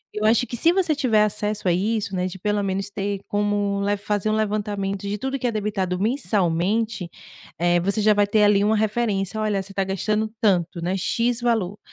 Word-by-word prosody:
eu 210 0 -1
acho 225 +3 +4
que - - -5
se 330 - +4
você 350 -4 +1
tiver 230 -7 +3
acesso 210 -1 -2
a - - +4
isso, 200 +2 -1
né, 180 0 0
de 185 - -7
pelo 210 +2 0
menos 195 0 -2
ter 200 0 -3
como 205 -1 0
le 205 +1 +1
fazer 205 +1 -1
um 215 - +1
levantamento 205 -2 -2
de 205 +1 -2
tudo 265 +5 -3
que 250 - -1
é - - 0
debitado 200 -4 -2
mensalmente, 210 - 0 0.5
eh, 175 0 +3
você 200 +5 0
já 210 +1 +5
vai 205 0 +2
ter 210 +1 +3
ali 205 -1 +4
uma 215 +2 +3
referência. 215 -2 -1
"Olha, 210 -2 0
você 195 +1 -10
está 195 0 -1
gastando 210 +3 -1
tanto, 175 -5 +1
né. 180 +3 -1
"X" 235 +5 0
valor, 220 -5 0
205 Hz, 205 wpm, -23 LUFS, 195-220 Hz, 0.5 s, já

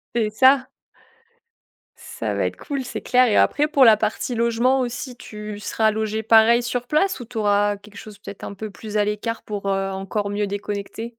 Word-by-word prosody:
C'est 220 -3 +1
ça. 260 +4 +4 1.3
Ça - - -5
va - - 0
être - - -7
cool, 280 -3 -4
c'est - - -6
clair 250 0 +3
et 210 - +1
après, 295 +1 +3
pour 275 -4 +4
la 220 -2 +7
partie 220 +3 -2
logement 235 +3 +2
aussi, 250 0 -4
tu 210 -3 -8
seras 220 +1 +1
logé 220 0 -2
pareil 225 +2 +5
sur 245 0 -3
place 310 0 +1
ou 245 - -7
tu 230 0 -10
auras 205 -1 +2
quelque 205 0 -16
chose 210 -2 -11
peut 200 -1 -9
être 200 - -14
un 200 - -6
peu 215 +1 -7
plus 215 +1 -6
à 205 - +2
l'écart 210 +2 -3
pour, 205 -2 -5
heu, 195 0 0
encore 195 +2 -3
mieux 205 0 -1
déconnecter? 205 +3 -5
220 Hz, 205 wpm, -22 LUFS, 205-245 Hz, 1.3 s, la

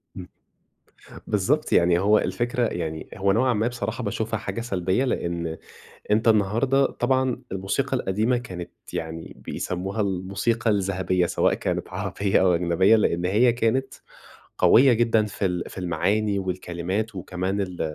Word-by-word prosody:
امم. 90 - -8 1.0
بالضبط 110 +9 0
يعني 85 0 +4
هو 105 +3 +4
الفكرة 120 +7 -1
يعني 80 -6 -4
هو 100 0 +2
نوعًا 125 +4 +2
ما 110 +2 +1
بصراحة 120 0 -4
باشوفها 110 -1 -2
حاجة 100 +3 -5
سلبيّة 95 0 0
لأن 85 -9 -2 0.6
أنت 110 +2 +2
النهارده 115 +6 +3
طبعًا 130 0 0
الموسيقى 100 +9 -1
القديمة 110 +3 0
كانت 90 -8 -7 0.2
يعني 80 0 -5
بيسموها 95 +4 -3
الموسيقى 100 +4 -1
الذهبية 95 -3 +1
سواء - - +1
كانت - - -2
عربيّة 100 -1 0
أو 90 -2 +4
أجنبية، 90 +5 +3
لأن 90 -5 +1
هي 115 +6 +3
كانت 125 +3 0 0.6
قويّة 130 +2 +6
جدًا 115 -2 +2
في 100 -1 -3
ال 90 -2 -1
في - - -12
المعاني 100 +3 0
والكلمات 95 +3 -3
وكمان 95 +2 -3
ال 90 -2 -5
100 Hz, 135 wpm, -24 LUFS, 90-115 Hz, 1.0 s, قويّة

